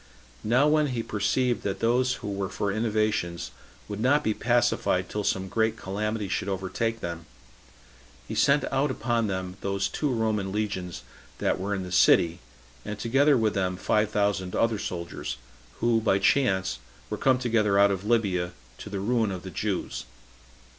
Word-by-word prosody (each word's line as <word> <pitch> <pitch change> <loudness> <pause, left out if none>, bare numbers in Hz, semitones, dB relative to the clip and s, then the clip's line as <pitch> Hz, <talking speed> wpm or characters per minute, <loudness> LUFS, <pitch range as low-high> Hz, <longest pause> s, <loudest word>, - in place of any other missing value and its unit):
Now 125 +6 +4
when 150 0 +3
he 120 -4 -2
perceived 115 +5 0
that 95 -1 -3
those 125 +2 +2
who 100 - -2
were 100 -1 -2
for 100 0 -2
innovations 110 -6 -1 0.4
would 105 -1 -5
not 140 +6 +3
be 110 - +1
pacified 120 +2 +1
till 105 - -3
some 95 -1 0
great 110 +2 0
calamity 105 +2 -3
should 95 +1 -2
overtake 100 +4 -2
them, 85 -1 -5 1.0
he - - -5
sent 140 +1 +3
out 140 +2 +1
upon 120 -3 0
them 95 -1 -4
those 100 0 0
two 150 +8 -2
Roman 110 -4 0
legions 95 -6 -3 0.3
that - - 0
were 100 +2 -1
in 95 - -3
the 90 - -7
city, 85 -1 +4 0.4
and 105 - -5
together 135 +6 +3
with 110 -2 +1
them 90 -2 -1
five 105 +2 +1
thousand 100 -3 0
other 115 -2 +1
soldiers, 85 -3 -5 0.4
who, 115 -1 +3
by 105 -3 +3
chance, 95 - +2 0.3
were - - 0
come 130 -1 +4
together 110 -5 +2
out 100 0 +6
of 95 -1 -2
Libya, 100 -6 +1 0.3
to - - -8
the 100 -1 -3
ruin 110 +1 +1
of 90 -2 -5
the 95 - -7
Jews. 90 - -3
105 Hz, 165 wpm, -27 LUFS, 95-115 Hz, 1.0 s, out